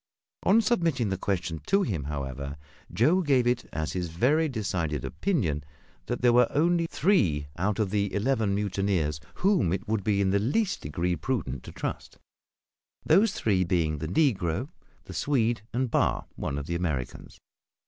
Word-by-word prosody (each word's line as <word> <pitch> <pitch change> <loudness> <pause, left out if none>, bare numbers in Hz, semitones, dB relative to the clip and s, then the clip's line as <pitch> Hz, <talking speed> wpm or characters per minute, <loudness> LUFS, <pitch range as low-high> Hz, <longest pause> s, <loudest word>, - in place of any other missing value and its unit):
On 220 +4 +4
submitting 165 - +1
the 95 - 0
question 85 -5 -2
to 195 0 +3
him, 85 - -2
however, 70 -1 -5 0.3
Joe 150 - +3
gave 135 -7 +3
it 125 +1 +1
as 80 0 -3
his 90 -2 -2
very 145 - +2
decided 90 - -2
opinion 85 - -1 0.4
that 120 0 -3
there 120 -1 +5
were 125 0 +5
only 170 +3 +2
three 90 - +1
out 100 +4 0
of 105 -4 0
the 100 -1 0
eleven 110 -2 +1
mutineers 95 -7 0 0.2
whom 185 - +2
it 95 - -3
would 110 -2 0
be 100 0 +1
in 95 -1 +2
the 100 - +3
least 185 - 0
degree 85 +5 -1
prudent 85 - -3
to - - -8
trust; - - -5 0.9
those 195 +6 +4
three 95 -4 +1
being 85 -4 0
the 80 - -3
negro, 95 - +1 0.3
the - - -10
Swede, 120 -5 +1
and 125 0 -1
Barr, - - +1
one 70 - -3
of 70 - -4
the 85 - -4
Americans. 75 -8 -3
100 Hz, 165 wpm, -27 LUFS, 85-135 Hz, 0.9 s, there